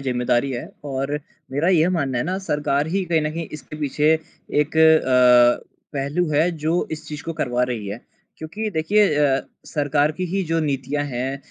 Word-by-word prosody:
ज़िम्मेदारी 125 0 0
है 120 - -4 0.2
और 135 0 -3 0.4
मेरा 150 +6 +1
यह 175 -1 +4
मानना 140 -8 -1
है - - -1
ना 185 +3 -2
सरकार 150 -5 0
ही 190 +3 0
कहीं 165 -2 +1
न 150 - -1
कहीं 165 0 -4
इसके 150 0 -9
पीछे 150 +2 +2 0.5
एक 150 +2 -2
अ, 125 -6 +5 0.3
पहलू 145 +5 -1
है 155 +4 +3
जो 165 +1 -1
इस 155 0 -6
चीज़ 150 -3 -6
को 165 - -3
करवा 125 -6 -1
रही 115 -5 -4
है। 105 +4 -6 0.4
क्योंकि 190 +8 -4
देखिए 205 +6 +3
अ, 140 -2 +3 0.3
सरकार 145 0 +1
की 185 +4 -4
ही 195 - +1
जो 165 0 0
नीतियाँ 145 0 -1
हैं 130 +1 -3
150 Hz, 185 wpm, -22 LUFS, 135-160 Hz, 0.5 s, अ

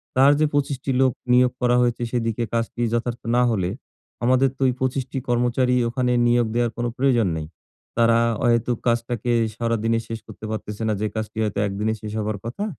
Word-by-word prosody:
তার 135 +2 +6
যে 155 - +4
২৫ 145 -1 0
টি 135 - -1
লোক 130 -1 +4 0.2
নিয়োগ 125 0 +5
করা 125 0 +3
হয়েছে, 120 -1 0
সেদিকে 115 -1 -1
কাজটি 115 +1 -2
যথার্থ 120 0 -2
না 125 - +4
হলে, 95 -5 0 0.5
আমাদের 130 +2 +4
তো - - -14
ওই 125 - +2
২৫ 130 +1 0
টি - - -4
কর্মচারী 125 +1 +2
ওখানে 125 +1 0 0.2
নিয়োগ 120 -1 +3
দেয়ার 120 -1 +1
কোন 120 - -1
প্রয়োজন 125 -5 +3
নেই। 80 -1 -5 0.5
তারা 115 0 +4 0.3
অহেতুক 120 0 +2
কাজটাকে 120 0 0 0.2
সারাদিনে 115 -1 0
শেষ 115 -1 -5
করতে 110 0 -10
পারতেছে 105 0 -5
না, 110 - +1
যে 110 - +1
কাজটি 110 0 -4
হয়তো 105 -2 -2
১ - - -4
দিনে 110 +1 +1
শেষ 105 - -6
হবার 105 0 -2
কথা। 120 - -4
120 Hz, 190 wpm, -23 LUFS, 115-125 Hz, 0.5 s, তার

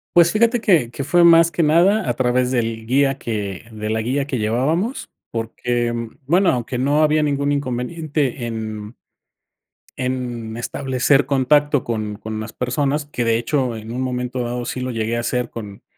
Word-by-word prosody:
Pues, 170 -1 +6
fíjate 230 +2 +2
que 160 - +3
que 140 - -4
fue 175 +5 +3
más 165 -1 +7
que 170 - 0
nada 175 +7 +3
a 120 - +1
través 125 0 +1
del 115 -3 -1
guía 135 +3 +2
que 105 -7 -4
de 110 -1 -5
la 110 0 0
guía 135 +5 -1
que 135 - -2
llevábamos 150 - 0 0.2
porque, 120 +1 -2 0.4
bueno 180 +5 +4
aunque 125 0 -2
no 140 +4 +2
había 155 0 +3
ningún 140 -1 0
inconveniente 140 0 -2
en 110 -1 -5 1.0
en 120 -3 -3
establecer 130 +3 +1
contacto 145 +1 +3
con 110 -3 -3
con 110 +1 -6
las 110 +1 -6
personas, 140 +4 -1
que 145 -4 -3
de 115 0 +3
hecho, 125 0 -1
en 110 +1 -8
un 125 +2 -3
momento 125 0 -3
dado 120 0 -3
sí 130 - -4
lo 130 - -3
llegué 115 0 -1
a - - -1
hacer 125 +1 -1
con 105 -4 -8
125 Hz, 175 wpm, -20 LUFS, 115-145 Hz, 1.0 s, más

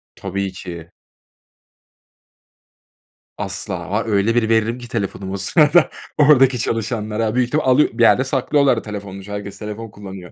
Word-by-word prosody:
Tabii 95 0 -4
ki. 85 -3 -9 2.5
Asla, 95 -3 -5
var 105 +4 -1
öyle 105 +2 +1
bir 115 -2 +2
veririm 115 +2 +2
ki 120 -1 -10
telefonumu 100 -4 -4
o - - -2
sırada 155 - +4 0.3
oradaki 135 -4 +5
çalışanlara 110 0 -2
büyük 125 -1 +2
ihtimalle 150 +1 -1
alıyor 130 +4 +4
bir 120 +1 +1
yerde 130 +3 +5
saklıyorlar 135 -1 +2
da - - -2
telefonumu 100 -2 -7
çünkü 100 - -10
herkes 100 -1 -6
telefon 105 +1 -6
kullanıyor. 95 -3 -10
110 Hz, 145 wpm, -19 LUFS, 100-125 Hz, 2.5 s, oradaki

